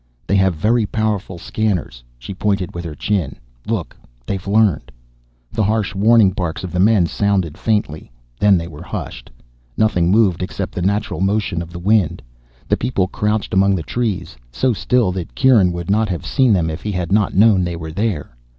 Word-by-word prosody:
"They 100 - 0
have 95 -2 +2
very 110 +7 +1
powerful 105 -4 -2
scanners." 90 - -2
She - - -8
pointed 95 -2 -1
with 85 - -5
her 80 -3 -6
chin. 90 -2 -1 0.3
"Look. 110 -7 -3 0.3
They've 95 +4 -4
learned." 100 -5 +2 0.6
The 110 - -1
harsh 105 -1 0
warning 105 0 +4
barks 90 -3 -4
of 90 - -5
the 90 - -2
men 100 -2 +4
sounded 95 -4 0
faintly, 100 - -2 0.3
then 100 -2 +5
were 75 - -10
hushed. - - -7 0.5
Nothing 90 -6 +2
moved, 100 -4 +3
except 90 - -4
by - - -4
the 90 - +2
natural 100 -4 -2
motion 100 -3 0
of 85 0 -8
the 85 - -8
wind. 100 0 +1 0.4
The - - +2
people 115 -6 0
crouched 105 0 -1
among 95 +1 +3
the 85 - -3
trees, 100 - -3 0.2
so 125 - +1
still 115 -1 +1
that 90 -2 -6
Kieran 120 -9 +4
would 85 +1 -4
not 110 +1 +2
have 90 -3 -4
seen 130 -3 +2
them 85 -5 +2
if 80 - -6
he 105 - -3
had 90 -1 -3
not 105 -1 +2
known 100 -2 +5
they 85 -1 -3
were 80 -1 -7
there. 85 - -3
95 Hz, 185 wpm, -19 LUFS, 85-110 Hz, 0.6 s, then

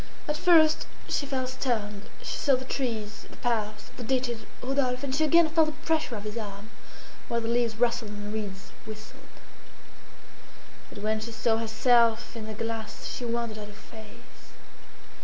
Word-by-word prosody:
At 300 - +1
first 315 -1 +5 0.2
she 285 - 0
felt 260 -2 -1
stunned; 215 -6 -2
she - - -3
saw 280 -2 +4
the 260 +1 -4
trees, 220 -6 -3
the - - -13
paths, 215 -3 -1
the 245 - -5
ditches, 240 -2 -1 0.2
Rodolphe, 255 -1 +1
and 270 -2 -2
she 305 +3 +2
again 335 +2 +6
felt 315 0 +4
the 310 +1 -7
pressure 310 -6 +1
of 205 - -5
his 215 +2 -4
arm, 205 0 -7 0.6
while 235 - +1
the 225 - -3
leaves 235 -1 +2
rustled 235 -1 +1
and 205 0 -6
the 210 - -4
reeds 200 -3 -5 0.2
whistled. 215 0 -9 1.7
But 205 - -9
when 215 0 +1
she 225 +2 -5
saw 225 0 +2
herself 230 +1 +3
in 220 -2 -5
the 215 - -5
glass 225 0 -4
she 250 - -4
wondered 235 -2 -2
at 210 - -6
her 210 - -11
face. 220 0 -14
230 Hz, 175 wpm, -28 LUFS, 215-260 Hz, 1.7 s, again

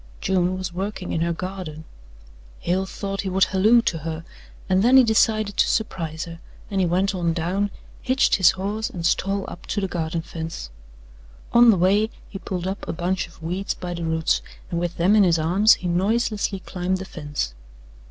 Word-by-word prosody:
June 185 -1 +1
was 185 -2 -4
working 190 0 -4
in 165 - -1
her 170 +1 +1
garden. 180 -3 -6 0.8
Hale 190 +2 0
thought 195 0 -4
he 195 - -3
would 190 +1 +3
halloo 210 +5 +4
to 165 - -1
her, 160 +1 -5 0.4
and 185 0 +3
then 250 +5 +6
he 260 - +8
decided 215 -2 +2
to - - +4
surprise 165 -7 -2
her, 165 -1 -9 0.3
and 195 -1 +1
he 180 - +2
went 190 +3 +1
on 170 -3 0
down, 180 +5 -1 0.3
hitched 260 +1 +3
his 185 -4 +6
horse 205 +3 -2
and 170 -2 -5
stole 195 +3 +1
up - - -10
to - - -1
the 195 - -1
garden 165 -2 -3
fence. 160 - -6 0.8
On 235 0 +7
the 210 - +5
way 200 +5 +3 0.2
he 195 - -8
pulled 180 -2 -4
up 190 +2 -4
a - - -2
bunch 180 +2 -1
of 170 -1 -18
weeds 180 +4 -2
by 175 -1 -5
the 170 -1 -5
roots 160 0 +1 0.3
and 170 - 0
with 175 0 -3
them 185 +5 +4
in 215 - +6
his 170 -3 +4
arms 185 +7 +5
he 180 - -5
noiselessly 200 +2 0
climbed 185 +1 -2
the 190 - -6
fence. 145 - -4
185 Hz, 195 wpm, -23 LUFS, 170-200 Hz, 0.8 s, he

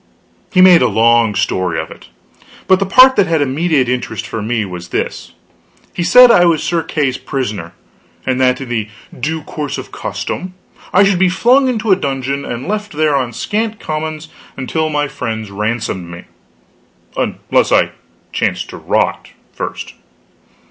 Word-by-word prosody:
He 185 - +4
made 185 -2 +7
a - - +4
long 115 -1 +3
story 95 -4 -1
of 80 - -6
it; - - -13 0.6
but 190 0 +4
the 195 - -1
part 255 +6 +7
that 200 -3 +4
had 165 -1 +1
immediate 145 0 +1
interest 125 -3 -3
for 110 0 -5
me 110 0 -1
was 90 -2 -8
this: - - -4 0.6
He - - -3
said 245 +8 +7
I 180 - +5
was 165 -3 +2
Sir 170 -1 0
Kay's 140 -5 -2
prisoner, 105 -10 -4 0.5
and 130 0 0
that 125 0 +2
in 135 - -7
the 110 -3 -2 0.3
due 155 +4 -2
course 150 -3 -5
of - - -8
custom 185 0 -5 0.4
I 190 - +5
would 195 -2 +2
be 190 -1 +4
flung 250 +8 +3
into 225 -3 -1
a - - +7
dungeon 140 -4 -3
and 120 +2 -5
left 210 -1 -3
there 150 -1 +1
on 130 -3 -1
scant 215 - -3
commons 155 0 -5 0.3
until 155 +4 -2
my 145 -1 0
friends 110 -6 -5
ransomed 105 -4 -3
me 85 0 -9 0.9
unless - - 0
I - - +3 0.4
chanced - - -2
to - - -8
rot, - - -1 0.2
first. - - -6
145 Hz, 165 wpm, -16 LUFS, 115-180 Hz, 0.9 s, made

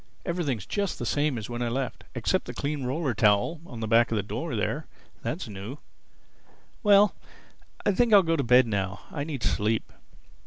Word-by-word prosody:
Everything's 155 - -2
just 200 -2 -2
the - - -4
same 145 -3 +1
as 110 - -5
when 120 0 -5
I 120 - 0
left—except 130 +1 -2
the - - -7
clean 145 -2 -2
roller 135 +1 -1
towel 105 +10 +2
on 115 -2 -8
the 110 - -2
back 115 +1 +4
of - - +1
the 105 - 0
door - - -4
there—that's - - -4
new—Well, 150 - -1 0.7
I - - +4
think 235 +4 +2
I'll 200 -2 +8
go 165 -1 +1
to 150 - +1
bed 125 0 +5
now. 95 -3 -2
I 145 - -3
need 145 -6 -5
sleep." 110 +2 0
130 Hz, 170 wpm, -27 LUFS, 110-165 Hz, 0.7 s, I'll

